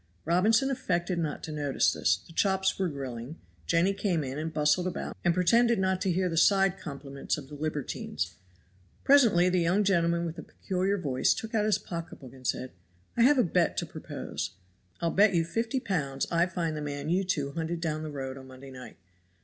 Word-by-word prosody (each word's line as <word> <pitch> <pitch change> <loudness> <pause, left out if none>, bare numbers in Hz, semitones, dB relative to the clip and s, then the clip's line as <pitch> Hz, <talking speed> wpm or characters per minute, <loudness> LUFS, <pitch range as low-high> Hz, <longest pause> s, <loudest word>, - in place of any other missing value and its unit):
Robinson 215 - +3
affected 180 -9 -1
not 155 -3 -3
to 160 - -5
notice 145 -3 +1
this; - - +2
the 165 - -15
chops 190 +2 +1
were 190 -2 +1
grilling, 135 -1 -6 0.3
Jenny 175 - +3
came 195 -5 0
in 135 +2 -4
and 160 +1 -3
bustled 150 +4 +2
about 180 - -4
and 175 - +4
pretended 230 +7 +3
not 190 -1 0
to 185 - +1
hear 185 +1 +1
the 165 -2 -3
side 195 +1 +4
compliments 140 -3 -4
of 140 -3 -9
the - - -11
libertines. 145 - -3 0.7
Presently 230 -11 +5
the 180 0 +2
young 180 +5 +2
gentleman 170 -3 +2
with 165 0 -5
the - - -5
peculiar 190 +2 -2
voice 140 -8 +1
took 225 +1 -6
out 215 -2 +2
his 215 - +3
pocketbook 165 -7 -8
and 130 -2 -7
said, 130 - -2 0.4
"I 235 - +1
have 275 +4 +6
a 250 - +5
bet 170 - +1
to - - 0
propose. - - -6 0.5
I'll 170 -1 +1
bet 200 -1 +4
you 165 -1 +2
fifty 230 +8 -1
pounds 140 - -2
I 170 +1 +3
find 170 -3 -2
the 150 - -4
man 145 0 -4
you 185 +3 +2
two 145 -7 -1
hunted 165 +2 -3
down 155 -2 -2
the 155 - -5
road 135 -2 -5
on 130 - -12
Monday 130 +1 -12
night." 125 -1 -11
170 Hz, 200 wpm, -29 LUFS, 145-190 Hz, 0.7 s, have